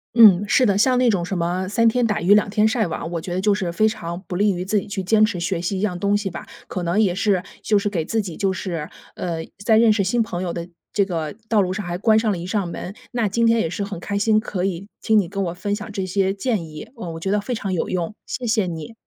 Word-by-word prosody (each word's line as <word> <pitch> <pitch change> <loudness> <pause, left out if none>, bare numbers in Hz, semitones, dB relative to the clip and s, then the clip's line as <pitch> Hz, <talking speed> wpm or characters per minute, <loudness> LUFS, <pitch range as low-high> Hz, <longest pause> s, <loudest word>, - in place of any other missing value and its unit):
嗯， 210 -5 +8
是 250 +5 +3
的， 200 -3 +2
像 250 +4 +4
那 250 -1 +4
种 195 -6 +1
什 180 +2 -3
么 180 +2 -1
三 230 +3 +3
天 245 +2 +3
打 210 -5 0
鱼 180 +4 +5
两 210 0 +3
天 210 +1 +3
晒 220 0 +1
网， 165 -1 -4
我 170 -2 -3
觉 175 - -5
得 180 - -1
就 205 +2 +3
是 190 -4 -2
非 215 +6 +3
常 170 -5 -4
不 180 - -4
利 205 +3 +3
于 180 -1 -3
自 205 +3 +1
己 200 - -1
去 200 -2 -4
坚 215 +4 +3
持 215 -5 +1
学 170 0 -1
习 185 +3 -2
一 - - -3
样 195 -4 -1
东 200 +2 +2
西 205 -1 -3
吧。 - - -8 0.2
可 180 - -4
能 175 +4 +1
也 195 -5 +3
是 200 -2 +2 0.2
就 210 -2 +3
是 200 - -2
给 175 -5 -1
自 220 +7 0
己 180 -5 -7
就 195 -1 0
是， 170 -4 -4 0.3
呃， 170 -2 -3 0.3
在 220 0 +4
认 225 -1 +6
识 205 -2 +1
新 230 +5 +1
朋 180 -5 -3
友 175 - -2
的 170 0 -5 0.2
这 200 - +2
个 165 -5 -3
道 215 -2 +3
路 185 -1 0
上 205 +2 -4
还 175 0 -3
关 220 +3 +4
上 220 -1 0
了 200 - 0
一 170 - -6
扇 190 0 -1
门。 175 +2 -6 0.2
那 235 -4 +1
今 230 +3 +2
天 230 0 +4
也 165 - -1
是 200 +4 -3
很 200 -4 -7
开 200 +2 -2
心， 215 +1 +3
可 190 -4 -1
以 190 0 -3 0.2
听 220 - +3
你 195 -5 +2
跟 195 +1 -3
我 170 - -3
分 200 +3 -3
享 210 +1 -5
这 195 -2 -2
些 190 +1 +1
建 200 -3 -1
议， 155 -1 -9
呃， 185 -7 -6
我 - - -6
觉 190 - -1
得 210 - +2
非 225 +5 -3
常 200 -3 -3
有 175 - -1
用， 180 +1 -2
谢 250 - -4
谢 220 -4 +1
你。 165 +4 -6
195 Hz, 315 characters per minute, -22 LUFS, 175-215 Hz, 0.3 s, 嗯